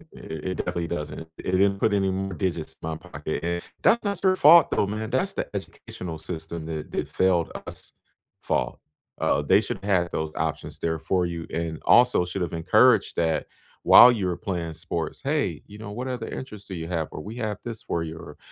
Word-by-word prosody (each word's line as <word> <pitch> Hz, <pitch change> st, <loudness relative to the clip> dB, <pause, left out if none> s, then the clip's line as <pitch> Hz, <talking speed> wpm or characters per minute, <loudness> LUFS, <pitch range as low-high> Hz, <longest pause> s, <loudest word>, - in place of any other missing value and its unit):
I -, -, -11 dB
i -, -, -13 dB
it 80 Hz, +4 st, -4 dB
definitely 85 Hz, -1 st, -2 dB
doesn't, 75 Hz, -3 st, -4 dB, 0.2 s
it -, -, -4 dB
didn't 100 Hz, +1 st, +3 dB
put 105 Hz, -, +2 dB
any 95 Hz, -1 st, +2 dB
more 95 Hz, +1 st, -2 dB
digits 85 Hz, -4 st, -3 dB
in 80 Hz, -, -4 dB
my 80 Hz, -, -3 dB
pocket. 80 Hz, -3 st, -5 dB
And, 85 Hz, 0 st, -1 dB, 0.2 s
that's 235 Hz, -, +4 dB
not 200 Hz, -3 st, -3 dB
your 185 Hz, -1 st, +4 dB
fault, 170 Hz, 0 st, +7 dB
though, 100 Hz, -, +2 dB
man. 110 Hz, +1 st, -4 dB
That's 160 Hz, +11 st, 0 dB
the -, -, -3 dB
educational 90 Hz, -3 st, -7 dB
system 80 Hz, 0 st, -6 dB
that 80 Hz, -2 st, -5 dB
that -, -, -2 dB
failed 90 Hz, -3 st, +2 dB, 0.2 s
us' -, -, -9 dB, 0.5 s
fault. -, -, -1 dB, 0.4 s
Uh, -, -, +2 dB
they 95 Hz, +8 st, +4 dB
should 100 Hz, -, -3 dB
have 100 Hz, -3 st, +3 dB
had 85 Hz, -, -10 dB
those 80 Hz, 0 st, -2 dB
options -, -, -3 dB
there 80 Hz, -1 st, -1 dB
for 90 Hz, +3 st, 0 dB
you, 85 Hz, -1 st, -4 dB
and 80 Hz, -1 st, -3 dB
also 125 Hz, -6 st, +5 dB
should 90 Hz, +2 st, -4 dB
have 85 Hz, -2 st, -2 dB
encouraged 105 Hz, +7 st, +4 dB
that 80 Hz, -2 st, +1 dB, 0.4 s
while 125 Hz, -, +10 dB
you 105 Hz, -6 st, -1 dB
were 90 Hz, -1 st, -1 dB
playing 85 Hz, -6 st, -3 dB
sports, 80 Hz, +1 st, -4 dB
"Hey," 135 Hz, -, 0 dB
you 105 Hz, -, -12 dB
know, 105 Hz, -1 st, -8 dB
"what 125 Hz, +5 st, -4 dB
other 125 Hz, -1 st, -4 dB
interests 105 Hz, -6 st, -8 dB
do 95 Hz, -, -7 dB
you 80 Hz, -2 st, -5 dB
have?" 80 Hz, -3 st, -2 dB
Or, -, -, -7 dB
"We 105 Hz, +7 st, -8 dB
have 110 Hz, -4 st, -3 dB
this 115 Hz, -2 st, -6 dB
for 85 Hz, -, -2 dB
you." 80 Hz, 0 st, -6 dB
Or, -, -, -11 dB
90 Hz, 215 wpm, -25 LUFS, 80-105 Hz, 0.5 s, while